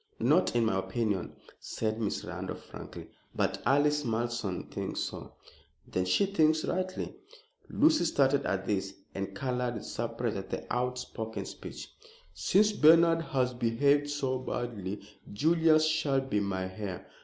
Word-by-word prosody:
"Not - - +3
in 120 -1 +3
my 95 -3 +1
opinion," 95 0 -2 0.2
said 110 0 -3
Miss 105 - -2
Randolph, - - -6
frankly, - - -9 0.3
"but - - 0
Alice 150 +2 +3
Malleson 115 -5 -2
thinks - - -3
so." - - -6 0.5
"Then 90 - -1
she 90 - +3
thinks 160 -5 +2
rightly." 185 +1 -2 0.6
Lucy 310 - +4
started 140 -3 +2
at 95 -1 -1
this 95 -1 -1 0.2
and 95 0 -4
colored 125 0 -1
with 110 - -6
surprise 115 0 -3
at 95 - -6
the - - -4
outspoken 125 -3 -3
speech. - - -8 0.5
"Since 210 +2 +3
Bernard 165 -2 +6
has 130 -6 0
behaved 140 +5 +2
so 135 -3 -1
badly, 115 -6 -4 0.3
Julius 155 +6 +4
shall 150 -3 +2
be 135 -6 -1
my 95 -2 -1
heir. 95 0 -5
125 Hz, 140 wpm, -30 LUFS, 105-150 Hz, 0.6 s, Bernard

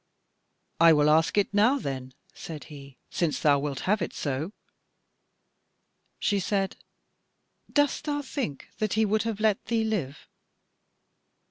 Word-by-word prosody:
"I 165 0 +8
will 150 0 +4
ask 160 +5 +3
it 205 0 +2
now, 220 +7 +4
then," 130 - -5 0.2
said 155 -3 -8
he, 140 -2 -12
"since 165 -4 0
thou 145 -2 +4
wilt 140 -2 -3
have 210 +2 +1
it 170 - -3
so." 145 +5 -2 1.7
She 205 -2 +1
said: 195 0 -1 1.0
"Dost 290 +1 +1
thou 290 -1 -1
think 255 - -4
that 215 -2 0
he 220 +1 +3
would 215 +1 +1
have 225 -2 -3
let 215 -2 +2
thee 230 -1 +1
live?" 175 -11 -3
195 Hz, 135 wpm, -27 LUFS, 145-220 Hz, 1.7 s, I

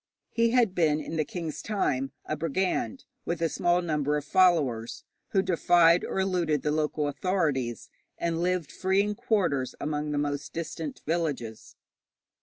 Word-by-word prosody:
He 230 0 +2
had 235 -5 +3
been 155 -4 +2
in 155 +2 -5
the 155 - +1
king's 165 0 -5
time 135 -11 -1
a 155 - -2
brigand 180 - -1 0.2
with 170 -1 -2
a 165 -1 +1
small 175 +2 +1
number 150 -3 0
of 145 - -5
followers, 135 -11 +2 0.2
who 190 -2 +1
defied 175 -2 +4
or - - -2
eluded 175 -6 0
the 150 - +1
local 150 -1 0
authorities, 145 -7 -1 0.3
and 170 -1 -1
lived 180 -4 0
free 190 +1 +1
in 210 0 -1
quarters 200 - 0
among 150 0 -2
the 150 - -1
most 145 0 -2
distant 160 -2 -5
villages. 145 -9 -3
165 Hz, 155 wpm, -28 LUFS, 145-185 Hz, 0.3 s, defied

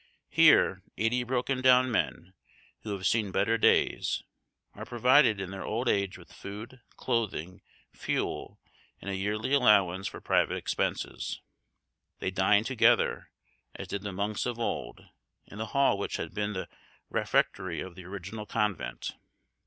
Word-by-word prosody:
Here - - +5 0.2
eighty 115 +3 +1
broken 130 +1 -1
down 130 0 +5
men, 95 -4 -2 0.5
who 110 - -7
have 95 -1 -5
seen 105 -1 +1
better 100 +4 +2
days, 115 - +2 0.5
are - - -8
provided 125 -2 +4
in 95 -1 -5
their 95 - -6
old 115 +4 -2
age 100 -4 +1
with 85 -1 -16
food, 105 +8 -9 0.2
clothing, 100 -8 -2 0.3
fuel, - - -3 0.4
and 100 - -5
a - - -2
yearly 105 +6 -2
allowance 100 -8 +4
for - - -7
private - - +1
expenses. - - -3 0.8
They 95 - -2
dine 95 +2 +3
together, 130 +1 +2 0.5
as - - -7
did 100 - -3
the 100 0 -5
monks 100 +4 -2
of 120 -1 -3
old, - - -4 0.4
in 105 - -11
the 110 - -3
hall 135 -5 +2
which - - -3
had - - -5
been 105 0 -2
the 95 - -4 0.4
refectory 90 -3 0
of 95 - -6
the 90 0 -11
original 100 +3 -7
convent. 100 - -2
105 Hz, 145 wpm, -29 LUFS, 95-120 Hz, 0.8 s, Here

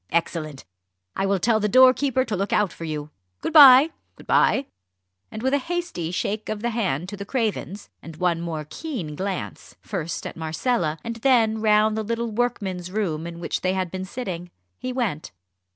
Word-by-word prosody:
Excellent! 160 -4 -2 0.5
I 195 - 0
will 200 0 +2
tell 220 +4 +2
the 210 0 0
doorkeeper 260 +2 +5
to 220 - -2
look 195 +2 -2
out 210 -3 +2
for 165 - -7
you. 150 -1 -5 0.3
Good - - -3
bye! 285 0 +9 0.2
good - - -15
bye!" 275 - +3 0.6
And 220 +1 -7
with 265 +1 +1
a 285 - +3
hasty 340 - -3
shake 205 +4 -3
of 215 0 -4
the 240 - 0
hand 180 - -1
to 205 - -6
the 200 - -6
Cravens, 210 -3 -3
and 165 -1 -10
one 170 0 0
more 160 -3 -4
keen 190 - -5
glance, 190 +2 -5
first 165 +1 -5
at - - -6
Marcella 160 +1 -1
and 230 0 -5
then 225 -3 +3
round 215 0 +3
the 220 - -1
little 230 +1 -2
workman's 200 -6 -2
room 175 -6 -2
in 170 0 -8
which 170 - -3
they 185 0 +1
had 185 -2 -2
been 185 0 -4
sitting, 185 -5 -6 0.3
he 255 - -4
went. 225 - -2
205 Hz, 185 wpm, -24 LUFS, 170-240 Hz, 0.6 s, bye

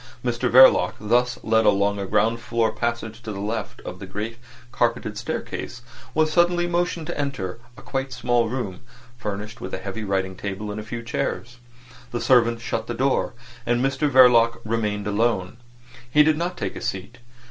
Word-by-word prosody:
Mr 120 -1 0
Verloc, 125 -8 +7
thus 120 +3 +1
led 110 0 +3
along 100 0 +2
a 100 - -3
ground 110 +3 +2
floor 115 -1 0
passage 115 -1 -3
to 110 - -6
the 100 - -6
left 105 +1 -4
of - - -8
the - - -8
great 115 +3 -5 0.3
carpeted 115 -3 0
staircase, 120 +3 -5 0.3
was 155 0 +2
suddenly 175 0 +3
motioned 175 -1 -1
to - - -4
enter 120 -9 -3 0.2
a - - -12
quite 135 0 -3
small 120 -2 +1
room 110 -7 -4 0.4
furnished 105 +2 -5
with 95 - -4
a - - -4
heavy 95 +3 -5
writing 95 -2 -1
table 100 +2 -5
and 105 - -5
a - - -5
few 115 +2 -6
chairs. 120 +1 -3 0.5
The 120 - -2
servant 115 -1 +3
shut 115 -1 -3
the 120 - -3
door, 130 -1 0 0.3
and 120 0 +1
Mr 135 +2 +1
Verloc 120 -3 +6
remained 105 -2 -1
alone. 105 -1 0 0.5
He 150 +4 +6
did 155 0 +3
not 175 +3 -3
take - - -3
a - - -7
seat. 100 +6 -5
115 Hz, 180 wpm, -23 LUFS, 105-125 Hz, 0.5 s, Verloc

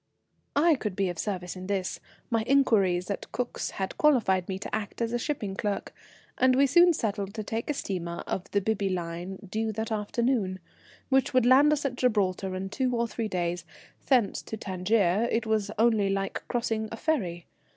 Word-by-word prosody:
I 320 +4 +5
could 210 -9 -3
be 195 -1 +1
of 175 -2 -5
service 185 -4 -3
in 185 0 -7
this; 195 -2 -2 0.3
my 225 -1 +2
inquiries 200 -9 +3
at 200 - -5
Cook's 250 -1 -3
had 190 -1 -5
qualified 210 -12 +3
me 190 - -2
to 200 - -4
act 215 -2 -5
as 230 0 -1
a 240 - +1
shipping 225 -8 -3
clerk, 205 0 -3 0.5
and 255 0 +5
we 275 +2 +5
soon 345 +6 +6
settled 200 - -2
to 215 - -3
take 225 +5 -4
a - - +2
steamer 170 -7 -4
of 195 +1 -4
the 200 - +1
Bibby 200 -1 0
Line 175 +1 -4
due 220 +3 -1
that 220 +2 -3
afternoon, 215 -2 0 0.5
which 265 -1 +2
would 255 -2 +5
land 270 +4 +6
us 300 -1 0
at 250 -2 -2
Gibraltar 195 -6 +1
in 190 +1 -4
two 250 +3 0
or 235 0 +1
three 225 0 -3
days. 175 -3 -2 0.4
Thence 245 -7 +3
to 220 - -7
Tangier 195 +2 +1 0.2
was 215 -2 0
only 220 -3 +3
like 195 0 -2
crossing 225 -2 -1
a 225 - -5
ferry. 185 - -1
210 Hz, 185 wpm, -28 LUFS, 190-240 Hz, 0.5 s, soon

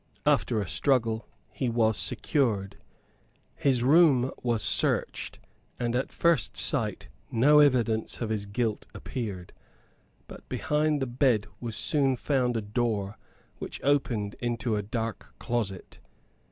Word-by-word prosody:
After 110 - +2
a 100 - -3
struggle 115 -5 +1 0.2
he 130 - -2
was 115 -2 +2
secured. 105 -6 0 0.8
His 130 -4 +1
room 135 -3 +5
was 120 -3 0
searched; - - +1 0.4
and 120 -1 -1
at 130 +3 -1
first 170 -8 +1
sight - - -1 0.2
no 145 +6 +5
evidence 120 -6 +2
of 115 -2 -3
his 105 -2 -2
guilt 110 +1 -2
appeared. 100 -8 -6 0.7
But - - -13
behind 150 -2 0
the - - 0
bed 120 -3 +1
was 115 -3 -4
soon 135 +1 +2
found 125 -2 0
a 110 - -3
door 105 -1 -2 0.4
which - - -6
opened 120 -8 +1
into 120 -1 -1
a 105 - 0
dark 110 +2 -5
closet. 110 -6 -4
120 Hz, 125 wpm, -27 LUFS, 110-135 Hz, 0.8 s, room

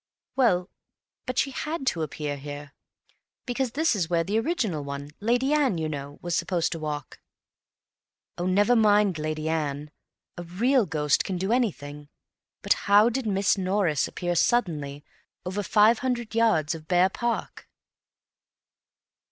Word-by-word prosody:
"Well, 185 -9 +2 0.6
but 255 - -3
she 275 - +1
had 305 +2 -4
to 170 -10 0
appear 150 -1 -3
here, 145 0 -8 0.7
because 245 -1 -2
this 315 -2 +2
is 175 -5 -1
where 170 -1 +2
the 205 +5 0
original 225 - -1
one—Lady 200 - -1
Anne, 280 - +2
you 160 -1 -2
know—was 145 +3 -5
supposed 170 -1 0
to 165 - -4
walk." 150 -2 -5 1.2
"Oh, 175 - -3
never 205 +6 +3
mind 205 -5 +3
Lady 155 0 -3
Anne! 150 -2 -2 0.5
A - - -5
real 225 +7 +1
ghost 150 -2 +1
can 185 - -3
do 190 +4 -2
anything. 150 - -2 0.5
But - - +4 0.2
how 205 +3 +6
did 245 -1 -3
Miss 195 0 +1
Norris 185 -6 +1
appear 175 -1 -3
suddenly—over 170 0 -2
five 215 +3 +4
hundred 245 -3 -2
yards 215 -9 +2
of 160 -1 -9
bare 180 +2 +4
park?" 235 +3 -4
185 Hz, 135 wpm, -26 LUFS, 155-230 Hz, 1.2 s, how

